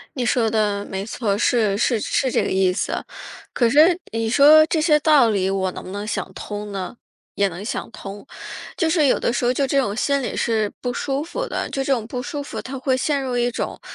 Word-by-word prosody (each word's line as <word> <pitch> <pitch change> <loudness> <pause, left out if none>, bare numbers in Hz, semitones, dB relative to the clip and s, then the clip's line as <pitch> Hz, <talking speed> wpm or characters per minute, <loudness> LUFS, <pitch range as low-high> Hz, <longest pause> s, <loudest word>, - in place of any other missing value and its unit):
你 255 -3 -1
说 235 -2 +2
的 205 -2 0
没 190 0 -4
错 225 -1 -3
儿， 200 - 0
是， 215 -3 +2
是 230 0 +1
是 260 +5 0
这 - - +1
个 - - -2
意 190 -1 +2
思。 195 - -3 0.5
可 240 - +2
是 330 +6 +5
你 225 0 -1
说 295 +6 +7
这 320 0 0
些 305 -1 +4
道 290 -6 +5
理 190 -3 0
我 190 -1 0
能 - - -8
不 - - -8
能 205 +2 -5
想 - - -4
通 205 0 -6
呢？ 195 +4 -5 0.4
也 200 - +2
能 180 +3 -8
想 220 - -4
通， 200 +4 -9 0.5
就 330 -2 +1
是 315 -4 +3
有 - - +2
的 235 - 0
时 245 - -1
候 245 - +3
就 275 +2 0
这 275 +1 +1
种 205 -6 -2
心 280 +4 +1
理 250 - -4
是 220 -3 0
不 245 - -2
舒 275 +3 -2
服 - - -4
的。 - - -3
就 270 -1 -2
这 275 - +1
种 235 -5 0
不 250 +1 -5
舒 290 +2 -5
服， 285 - -6
它 265 +1 -7
会 260 0 0
陷 280 +1 0
入 255 -2 -2
一 240 0 +2
种， 245 - -4
240 Hz, 260 characters per minute, -21 LUFS, 205-280 Hz, 0.5 s, 说